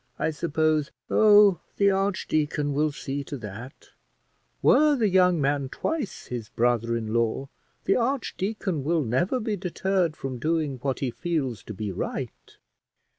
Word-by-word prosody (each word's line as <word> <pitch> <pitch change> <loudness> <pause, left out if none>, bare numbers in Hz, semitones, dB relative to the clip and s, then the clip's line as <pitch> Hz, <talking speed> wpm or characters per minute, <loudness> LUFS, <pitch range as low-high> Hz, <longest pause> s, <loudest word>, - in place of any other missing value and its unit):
I 160 - 0
suppose 155 -1 0
" - - -53
"Oh, 205 -4 +6 0.2
the 200 0 +4
archdeacon 155 -7 0
will 150 +2 +1
see 140 0 -4
to 140 - -6
that: 115 +3 -10 0.7
were 300 -1 +5
the 225 -6 +2
young 180 -2 +4
man 140 -1 0
twice 300 - -3
his 120 -4 -6
brother 115 -1 +1
in 110 -1 -4
law, 115 +4 0 0.3
the 195 - +2
archdeacon 215 - -2
will 160 +1 +1
never 135 - 0
be 215 -2 -2
deterred 185 -2 -1
from 130 -2 -5
doing 155 -2 -1
what 135 -1 -2
he 130 -3 -1
feels 130 - -2
to 105 - -7
be 105 0 -4
right." 90 - -6
155 Hz, 150 wpm, -26 LUFS, 130-190 Hz, 0.7 s, Oh